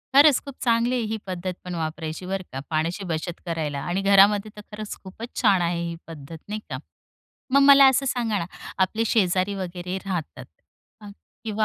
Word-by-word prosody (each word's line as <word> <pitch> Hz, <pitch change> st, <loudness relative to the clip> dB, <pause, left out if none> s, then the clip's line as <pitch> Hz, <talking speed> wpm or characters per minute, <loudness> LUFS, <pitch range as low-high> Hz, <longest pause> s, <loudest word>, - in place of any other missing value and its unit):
खरंच 285 Hz, -1 st, +7 dB
खूप 280 Hz, -2 st, -8 dB
चांगली 235 Hz, +1 st, +2 dB
आहे 245 Hz, -, 0 dB
ही 220 Hz, +1 st, -2 dB
पद्धत, 185 Hz, 0 st, -3 dB
पण 180 Hz, -1 st, -5 dB
वापरायची 160 Hz, +1 st, -4 dB
बरं 190 Hz, 0 st, -3 dB
का 135 Hz, -, -3 dB
पाण्याची 165 Hz, +4 st, -1 dB
बचत 170 Hz, +1 st, -4 dB
करायला 155 Hz, -4 st, -2 dB
आणि 175 Hz, +7 st, -2 dB
घरामध्ये 200 Hz, +2 st, +5 dB
तर 210 Hz, -, -9 dB
खरंच 210 Hz, 0 st, -6 dB
खूपच 210 Hz, +5 st, -8 dB
छान 200 Hz, -6 st, +4 dB
आहे 170 Hz, 0 st, 0 dB
ही 170 Hz, -, -4 dB
पद्धत 160 Hz, 0 st, -9 dB
नाही 210 Hz, +1 st, -3 dB
का. -, -, -3 dB, 0.7 s
मग 280 Hz, +1 st, +5 dB
मला 275 Hz, 0 st, +8 dB
असं 265 Hz, +1 st, +1 dB
सांगा 235 Hz, -5 st, 0 dB
ना, 170 Hz, -, -2 dB, 0.3 s
आपले 190 Hz, +4 st, +1 dB
शेजारी 195 Hz, -2 st, +2 dB
वगैरे 180 Hz, -1 st, -4 dB
राहतात 180 Hz, -5 st, -4 dB, 1.0 s
किंवा 215 Hz, -1 st, -1 dB
190 Hz, 175 wpm, -24 LUFS, 170-220 Hz, 1.0 s, मला